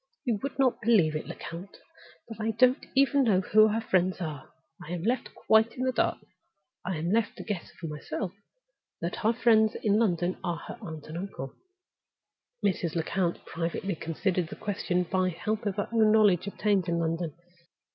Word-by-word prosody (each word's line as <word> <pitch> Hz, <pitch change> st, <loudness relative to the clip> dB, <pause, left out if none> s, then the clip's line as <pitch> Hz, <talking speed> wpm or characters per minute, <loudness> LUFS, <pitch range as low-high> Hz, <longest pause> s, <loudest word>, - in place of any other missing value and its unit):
You 230 Hz, -5 st, 0 dB
may 275 Hz, -, -1 dB
not 265 Hz, -3 st, +2 dB
believe 205 Hz, -9 st, +4 dB
it, 155 Hz, -, -4 dB
Lecount, 175 Hz, +4 st, -8 dB, 0.5 s
but 225 Hz, -2 st, -8 dB
I 220 Hz, -, 0 dB
don't 250 Hz, +4 st, +3 dB
even 275 Hz, +1 st, +4 dB
know 200 Hz, -5 st, +4 dB
who 215 Hz, +3 st, +5 dB
her 220 Hz, +1 st, 0 dB
friends 185 Hz, -4 st, +1 dB
are. 155 Hz, -6 st, -5 dB, 0.3 s
I 165 Hz, -, -6 dB
am 170 Hz, -2 st, -4 dB
left 240 Hz, +4 st, -1 dB
quite 220 Hz, +1 st, +3 dB
in 255 Hz, -, -1 dB
the 260 Hz, -, +2 dB
dark; -, -, +1 dB, 0.7 s
I 185 Hz, -2 st, -2 dB
am 165 Hz, +3 st, -2 dB
left 225 Hz, +1 st, +1 dB
to -, -, -6 dB
guess 205 Hz, -6 st, -4 dB
for 170 Hz, -, -6 dB
myself 160 Hz, +5 st, -4 dB, 0.7 s
that 170 Hz, +1 st, -3 dB
her 220 Hz, -, +2 dB
friends 225 Hz, -2 st, +4 dB
in 210 Hz, 0 st, +2 dB
London 180 Hz, -4 st, +1 dB
are 175 Hz, -3 st, -1 dB
her -, -, -9 dB
uncle 160 Hz, -7 st, -8 dB
and 190 Hz, +4 st, -4 dB
aunt." 135 Hz, +1 st, -4 dB, 1.2 s
Mrs. 175 Hz, -4 st, 0 dB
Lecount 170 Hz, +1 st, -1 dB
privately 170 Hz, +4 st, -3 dB
considered 170 Hz, +2 st, -1 dB
the -, -, -8 dB
question 185 Hz, -3 st, -1 dB
by 185 Hz, +1 st, 0 dB
the 170 Hz, -, -6 dB
help 215 Hz, +3 st, -2 dB
of 195 Hz, -, -1 dB
her 205 Hz, -, -2 dB
own 220 Hz, -2 st, +4 dB
knowledge 205 Hz, -4 st, +4 dB
obtained 200 Hz, -3 st, +1 dB
in 170 Hz, -, +1 dB
London. 165 Hz, -1 st, -1 dB
195 Hz, 185 wpm, -28 LUFS, 170-220 Hz, 1.2 s, who